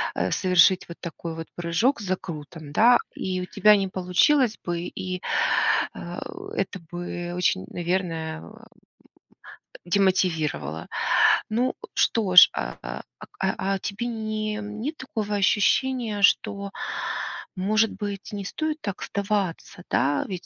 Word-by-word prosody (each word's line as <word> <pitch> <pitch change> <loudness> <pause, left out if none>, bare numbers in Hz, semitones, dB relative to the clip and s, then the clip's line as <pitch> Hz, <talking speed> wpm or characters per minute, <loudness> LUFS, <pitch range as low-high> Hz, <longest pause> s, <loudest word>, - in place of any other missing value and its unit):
э, - - 0
совершить 185 0 +4
вот 170 - -9
такой 170 0 -6
вот 165 0 -6
прыжок 175 +11 +1
с 205 - -6
закрутом, 160 -4 -5
да, 235 +9 +6 0.2
и 185 -1 -3
у - - -3
тебя 210 +3 +5
не 195 -1 0
получилось 210 +8 +2
бы, 175 -1 -1
и, 185 0 -5 0.7
э, - - -7 0.4
это 190 - -2
бы 175 0 -5
очень, 175 - +1
наверное, 170 - -2
а, - - -12
м, - - -14 1.2
демотивировало. 170 - 0 0.6
Ну 240 +4 0 0.2
что 205 -5 +1
ж, 180 - +11
а, - - -4
а, - - -5 0.2
ак - - -11
а, - - 0 0.2
а - - -4
тебе 210 +5 -4
не 215 -2 -3
нет 215 +9 -5
такого 215 -5 -3
ощущения, 215 +2 +2
что, 200 0 +2 0.8
может 215 +4 +2
быть, 205 -2 -6
не 200 -1 -4
стоит 310 +8 -2
так 200 -3 -5
сдаваться, 200 -3 -2
да, 140 +1 +1
ведь 185 -2 -6
190 Hz, 135 wpm, -25 LUFS, 175-215 Hz, 1.2 s, ж